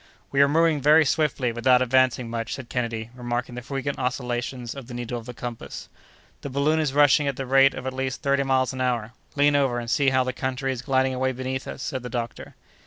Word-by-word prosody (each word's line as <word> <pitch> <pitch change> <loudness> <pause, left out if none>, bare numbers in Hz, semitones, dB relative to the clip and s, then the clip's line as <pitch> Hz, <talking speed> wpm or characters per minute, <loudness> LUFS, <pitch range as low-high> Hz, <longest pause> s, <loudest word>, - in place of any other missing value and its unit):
"We 140 - +3
are 140 - +6
moving 160 0 +2
very 155 +3 +6
swiftly 140 -4 +1
without 125 +2 +3
advancing 130 -1 +2
much," 115 -1 -3
said 130 -3 -9
Kennedy, 115 -2 -3
remarking 120 0 -3
the 125 - -6
frequent 135 +2 -4
oscillations 125 -1 -3
of 135 -4 -9
the 125 - -8
needle 120 0 -4
of 115 - -13
the 125 - -6
compass. 120 -1 -7 0.5
"The 140 - -5
balloon 145 +4 +1
is 155 -3 0
rushing 145 0 +4
at 140 - -1
the 135 - -4
rate 135 +1 +5
of - - -7
at 130 - -3
least 130 +2 -3
thirty 140 -1 +2
miles 130 -1 +1
an 130 - -4
hour. 120 -3 -1 0.2
Lean 145 0 +4
over, 135 -4 +2
and 120 0 -5
see 140 -2 +3
how 130 -1 +2
the 130 0 -3
country 130 +1 -2
is 125 - -6
gliding 130 0 +1
away 130 +1 0
beneath 130 +1 -4
us!" 130 - -6
said 130 - -3
the 125 - -7
doctor. 120 -1 -5
130 Hz, 230 wpm, -24 LUFS, 120-140 Hz, 0.5 s, are